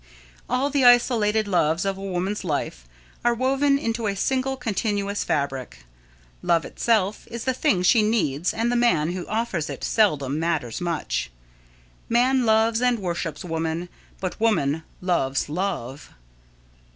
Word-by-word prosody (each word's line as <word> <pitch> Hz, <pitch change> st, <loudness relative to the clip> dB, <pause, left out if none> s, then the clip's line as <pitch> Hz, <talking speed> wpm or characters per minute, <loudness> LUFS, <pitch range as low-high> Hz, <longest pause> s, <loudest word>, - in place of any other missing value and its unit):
All 275 Hz, +3 st, 0 dB
the 280 Hz, -1 st, +2 dB
isolated 225 Hz, -3 st, +4 dB
loves 170 Hz, -2 st, +1 dB
of 195 Hz, 0 st, 0 dB
a 195 Hz, -, -10 dB
woman's 195 Hz, +2 st, -2 dB
life 140 Hz, -, -3 dB, 0.4 s
are 240 Hz, 0 st, +3 dB
woven 275 Hz, +3 st, +2 dB
into 230 Hz, -4 st, -2 dB
a 200 Hz, -, -1 dB
single 265 Hz, +5 st, 0 dB
continuous 205 Hz, -4 st, -1 dB
fabric. 130 Hz, -, -3 dB, 0.6 s
Love 170 Hz, -1 st, +2 dB
itself 215 Hz, -3 st, 0 dB
is 235 Hz, -1 st, -6 dB
the 260 Hz, -, 0 dB
thing 250 Hz, -, +1 dB
she 220 Hz, +5 st, +5 dB
needs 180 Hz, -8 st, +1 dB
and 230 Hz, +2 st, -1 dB
the -, -, +1 dB
man 175 Hz, -10 st, +2 dB
who 180 Hz, -1 st, -5 dB
offers 215 Hz, -8 st, -2 dB
it -, -, -7 dB
seldom 150 Hz, -, +1 dB
matters 160 Hz, -8 st, -2 dB
much. 155 Hz, -, -2 dB, 0.8 s
Man 250 Hz, +1 st, +3 dB
loves 220 Hz, +1 st, +3 dB
and 250 Hz, -1 st, +3 dB
worships 175 Hz, -4 st, -4 dB
woman, 165 Hz, +1 st, -3 dB, 0.3 s
but 185 Hz, -1 st, -4 dB
woman 160 Hz, -9 st, +2 dB, 0.2 s
loves 145 Hz, -8 st, 0 dB
love. 155 Hz, -6 st, -4 dB
195 Hz, 140 wpm, -24 LUFS, 160-235 Hz, 0.8 s, she